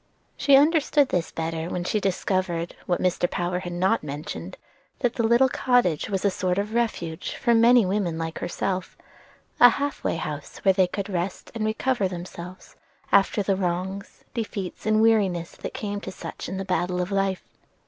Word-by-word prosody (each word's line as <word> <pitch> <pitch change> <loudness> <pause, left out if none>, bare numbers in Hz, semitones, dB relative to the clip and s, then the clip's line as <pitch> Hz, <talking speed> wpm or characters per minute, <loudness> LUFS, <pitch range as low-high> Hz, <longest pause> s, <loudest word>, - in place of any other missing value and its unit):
She 280 - +5
understood 295 -1 +4
this 175 -2 0
better 165 +1 -3
when 180 - -3
she 210 +4 0
discovered, 185 -3 -1
what 175 - +1
Mr. 180 -1 +1
Power 180 0 -1
had 175 -1 -6
not 190 +6 +2
mentioned, 145 +1 -6 0.4
that 245 -3 +1
the 235 - -1
little 235 +3 +5
cottage 245 - +1
was 195 -1 -1
a 200 - +4
sort 185 0 -1
of 205 +2 -2
refuge 215 -9 -2
for 235 -3 +2
many 235 0 +6
women 185 -4 -1
like 165 0 -4
herself; 185 +1 -3 0.6
a 245 - +10
half 285 +4 -3
way - - 0
house 150 -3 -5
where 190 - +6
they 185 -1 +3
could 195 +2 -4
rest 185 -1 -4
and 220 -2 -1
recover 220 -1 0
themselves 180 0 -9 0.4
after 200 +1 +4
the 195 0 +1
wrongs, 190 +2 -3
defeats, 210 -4 -4
and 215 0 +4
weariness 195 -7 +2
that - - -6
come 205 -1 -4
to 190 - -6
such - - -7
in 190 - -4
the 195 - -4
battle 180 -1 0
of 180 +2 -2
life. 195 -1 0
190 Hz, 180 wpm, -25 LUFS, 175-220 Hz, 0.6 s, a